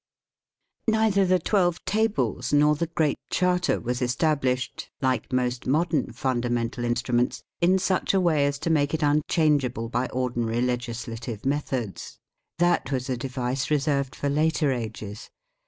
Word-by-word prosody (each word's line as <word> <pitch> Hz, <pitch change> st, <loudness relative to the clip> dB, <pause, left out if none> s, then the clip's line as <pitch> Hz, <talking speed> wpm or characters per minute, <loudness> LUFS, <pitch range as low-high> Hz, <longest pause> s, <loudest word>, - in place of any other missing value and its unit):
Neither 220 Hz, -3 st, +3 dB
the 185 Hz, 0 st, +4 dB
Twelve 175 Hz, -1 st, +1 dB
Tables 155 Hz, -, 0 dB
nor 150 Hz, +1 st, +5 dB
the 165 Hz, +3 st, -1 dB
Great 155 Hz, -3 st, 0 dB
Charter 180 Hz, -1 st, +1 dB
was 125 Hz, +1 st, -3 dB
established, 130 Hz, 0 st, 0 dB
like 130 Hz, -1 st, 0 dB
most 125 Hz, -1 st, -1 dB
modern 155 Hz, +1 st, +1 dB
Fundamental 120 Hz, -1 st, -1 dB
In 120 Hz, 0 st, +1 dB
struments, 120 Hz, 0 st, 0 dB, 0.2 s
in 180 Hz, +2 st, +4 dB
such 190 Hz, +1 st, +1 dB
a -, -, +4 dB
way 155 Hz, -6 st, +3 dB
as 140 Hz, 0 st, -2 dB
to 165 Hz, -, +2 dB
make 145 Hz, -1 st, +2 dB
it 155 Hz, -, -2 dB
unchangeable 145 Hz, -5 st, +1 dB
by 125 Hz, +2 st, 0 dB
ordinary 120 Hz, -2 st, -1 dB
legislative 120 Hz, -2 st, -4 dB
methods. 135 Hz, -7 st, -3 dB, 0.4 s
That 175 Hz, -3 st, +2 dB
was 130 Hz, 0 st, -2 dB
a -, -, +1 dB
device 130 Hz, +1 st, -2 dB
reserved 140 Hz, -2 st, 0 dB
for 145 Hz, -, -2 dB
later 150 Hz, 0 st, +2 dB
ages. 110 Hz, -3 st, -5 dB
135 Hz, 140 wpm, -25 LUFS, 125-160 Hz, 0.4 s, nor